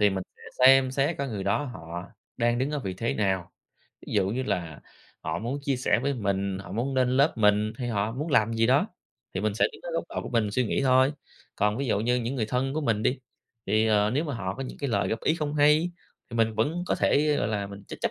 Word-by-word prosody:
thì 105 -1 +5
mình 95 -1 -2
sẽ - - -19 0.2
xem 135 -1 +7
xét 140 +4 0
cái 140 -1 -2
người 100 -4 -4
đó 105 +8 +1
họ 85 - -7 0.3
đang 120 0 +1
đứng 135 +3 0
ở 150 - -1
vị 95 -8 -4
thế 115 +5 -2
nào? 95 -4 0 0.6
Ví - - -7
dụ 95 - +2
như 125 +5 -1
là 85 - -3 0.4
họ - - -3
muốn 125 +6 -3
chia 140 -2 0
sẻ 125 - +2
với 140 +1 0
mình, 100 -4 -1
họ 95 -1 -9
muốn 130 +5 -2
lên 125 -1 +3
lớp 140 -2 +3
mình, 105 0 +3
hay 125 - -3
họ 110 -1 -1
muốn 150 +6 -4
làm 115 -4 +3
gì 115 0 +3
đó, 130 +3 +3 0.5
thì - - -1
mình 105 -1 0
sẽ 115 - +2
đứng - - -14
ở 175 - -5
góc 165 - -1
độ - - -4
của - - -6
mình 115 -4 +1
suy 125 +3 +1
nghĩ 135 - 0
thôi. 130 +2 +4 0.4
Còn 105 +1 +1
ví 140 - -1
dụ 105 - +1
như 125 +3 +2
những 120 +2 -2
người 110 -5 -1
thân 130 +4 -1
của 155 - 0
mình 115 -6 0
đi, 130 +3 +1 0.5
thì, 110 +2 +2
ờ, 105 -1 +3
nếu 145 +6 0
mà 145 -4 -3
họ 95 -3 -3
có 135 - -5
những 130 - -8
cái 140 - -2
lời - - +1
góp 110 - -2
ý 155 - +2
không 150 -2 -3
hay, 150 +4 +4 0.4
thì 115 - -5
mình 115 -1 +2
vẫn 155 +11 0
có - - +1
thể, 150 +1 +2
ơ, - - -1
gọi 100 - 0
là, 100 -2 -2
mình 100 0 -10
ch - - -6
chấp - - 0
115 Hz, 270 wpm, -27 LUFS, 105-135 Hz, 0.6 s, xem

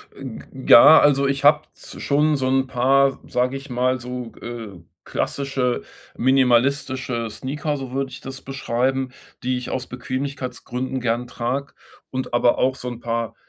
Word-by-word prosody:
Äh, 135 - -11
g 120 -4 -7
g 130 - -3
ja, 155 +7 +10
also 140 -1 +4
ich 135 0 -1
habe 150 +1 +6
s - - -11
schon 150 +2 +2
so 130 -1 -1
'n 135 0 +2
paar, 135 +2 +3
sage 125 +2 0
ich 135 +1 -11
mal 130 +1 +1
so, 125 -1 -6
äh, 115 -6 -7 0.2
klassische 135 -3 -1 0.3
minimalistische 130 -1 +2
Sneaker, 140 +6 -3
so 135 -2 -7
würde 135 0 -2
ich - - -9
das 135 0 -8
beschreiben, 130 0 -1 0.3
die 125 0 0
ich 125 - -5
aus 130 -1 -3
Bequemlichkeitsgründen 130 0 -4
gern 120 0 0
trage. 125 +4 -3 0.4
Und 130 -1 -4
aber 120 0 +3
auch 130 0 +2
so 125 - -8
'n 120 -1 -7
paar 115 -2 -3
130 Hz, 165 wpm, -22 LUFS, 125-135 Hz, 0.4 s, ja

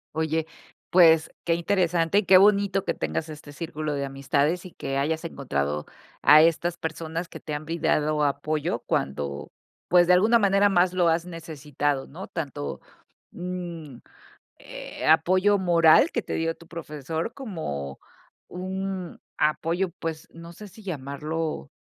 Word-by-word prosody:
Oye, 160 0 -1 0.4
pues, 165 -3 +6
qué 170 - +1
interesante 170 0 +1
y 210 - -1
qué 185 0 +7
bonito 200 -1 +3
que - - 0
tengas 160 - -3
este 150 -1 -10
círculo 155 -1 -4
de 140 -1 -2
amistades 140 +5 0
y 180 - -9
que 135 -3 -4
hayas 160 +4 -1
encontrado 75 - -2 0.4
a 150 +1 +8
estas 170 +1 +2
personas 160 +1 -4
que - - -10
te 150 - -6
han 150 +1 -4
brindado 155 -2 0
apoyo 145 +2 -1
cuando, 70 +1 -3 0.4
pues, 175 -1 +5
de 180 - +6
alguna 220 +6 +5
manera 200 0 +4
más 180 -1 +3
lo 175 -2 +3
has 165 +1 +1
necesitado, 150 -5 -3
¿no? 185 +6 -9
Tanto, 140 - -5 0.5
mm, 175 -6 -6 0.6
eh, - - -8
apoyo 185 +6 +4
moral 170 - +5
que - - -2
te - - -5
dio 165 0 -1
tu 170 - -17
profesor, 160 - -5
como 70 - -6 0.5
un 190 0 -5 0.2
apoyo, 170 +4 0
pues, 160 -1 -5
no 165 +1 -11
sé 210 +4 -11
si 200 +4 -15
llamarlo 155 - -4
165 Hz, 145 wpm, -25 LUFS, 150-180 Hz, 0.6 s, a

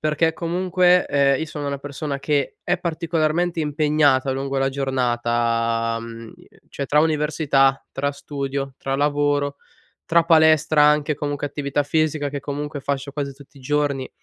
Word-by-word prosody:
perché, 155 +1 +1
comunque, 180 +1 +2
ehm, 140 -1 +2
io 160 - -2
sono 150 -2 -6
una 140 0 -2
persona 140 0 -5
che 140 0 -1
è 180 0 0
particolarmente 165 0 -1
impegnata 150 -3 +2
lungo 135 +1 -3
la 135 0 +1
giornata, 120 -3 0
mhmm, 115 0 -9 0.4
cioè, 140 - -4
tra 150 +3 +3
università, 150 -3 +1
tra 140 +1 -1
studio, 140 -1 -5
tra 135 0 -2
lavoro, 145 0 0 0.5
tra 170 0 +4
palestra, 155 -2 +4
anche 150 0 +3
comunque 145 0 -3
attività 145 0 -2
fisica, 150 0 0
che 140 0 -4
comunque 145 0 -5
fascio 140 0 -3
quasi 140 -1 -4
tutti 140 +1 -18
i - - -15
giorni, 140 -1 -1
145 Hz, 150 wpm, -22 LUFS, 135-155 Hz, 0.5 s, tra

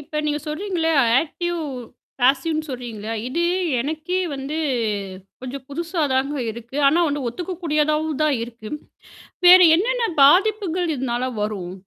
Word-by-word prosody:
இப்ப 300 +1 -4
நீங்க 295 0 0
சொல்றீங்கல்ல! 330 +1 -2 0.3
ஆக்டிவ், 345 +2 -4 0.6
ஃபேசீவ்ன்னு 310 +5 +1
சொல்றீங்கல்ல. 235 -5 -6 0.2
இது 335 +7 -1 0.4
எனக்கே 315 +7 -2 0.2
வந்து 275 +3 -5 0.9
கொஞ்சம் 260 +1 -7
புதுசாதாங்க 290 -3 -1 0.2
இருக்கு. 235 +3 -9
ஆனா 310 +5 +2
ஒண்ணு, 290 -2 -3
ஒத்துக்க 350 +10 -5
கூடியதாவும்தான் 305 -2 +1
இருக்கு. 230 -2 -9 0.8
வேற 365 +1 +10 0.2
என்னென்ன 470 +6 0
பாதிப்புகள் 360 +1 +3
இதனால 255 -1 -2
வரும்? 200 -4 -4
300 Hz, 110 wpm, -22 LUFS, 260-340 Hz, 0.9 s, வேற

